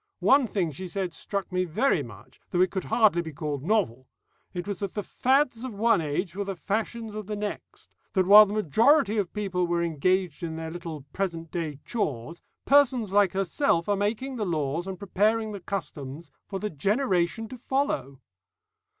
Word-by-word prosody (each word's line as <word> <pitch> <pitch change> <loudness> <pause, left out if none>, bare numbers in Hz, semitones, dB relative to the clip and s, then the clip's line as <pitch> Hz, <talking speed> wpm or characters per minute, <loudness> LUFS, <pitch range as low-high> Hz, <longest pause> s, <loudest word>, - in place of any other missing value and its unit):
One 270 -2 +4
thing 180 -7 -1
she 185 +6 -7
said 180 0 -3
struck 200 +2 -4
me 185 0 +1
very 180 - +1
much, 110 -5 -12
though 180 - +1
it 185 -1 +3
could 190 - -3
hardly 210 -7 +3
be 160 -1 -7
called 145 -2 -4
novel. 155 - 0 0.4
It 175 +1 -5
was 200 -3 -3
that 200 -3 -4
the 205 - -2
fads 260 -1 +1
of 255 -5 -5
one 225 -3 +3
age 165 +4 -2
were 200 - -2
the 195 -1 -4
fashions 220 +4 -3
of 210 -2 -6
the 210 - -3
next; 210 0 -7 0.2
that 185 -2 +3
while 210 +2 +9
the 200 - -4
majority 220 - +3
of 190 -4 -2
people 185 -4 -1
were 170 0 0
engaged 170 +1 0
in 165 -2 -4
their 160 0 -5
little 165 -4 -7
present 165 -4 -3
day 155 -5 -4
chores, 155 - -3 0.2
persons 260 -7 +4
like 200 -1 +4
herself 190 - +1
are 205 - +2
making 225 +6 -2
the 220 - -1
laws 160 0 -1
and 190 -1 -5
preparing 215 +4 +1
the 200 - -6
customs 165 -6 -6 0.2
for 195 - -4
the 210 +2 -3
generation 195 - 0
to 255 - -8
follow." 140 - -2
190 Hz, 185 wpm, -27 LUFS, 165-215 Hz, 0.4 s, while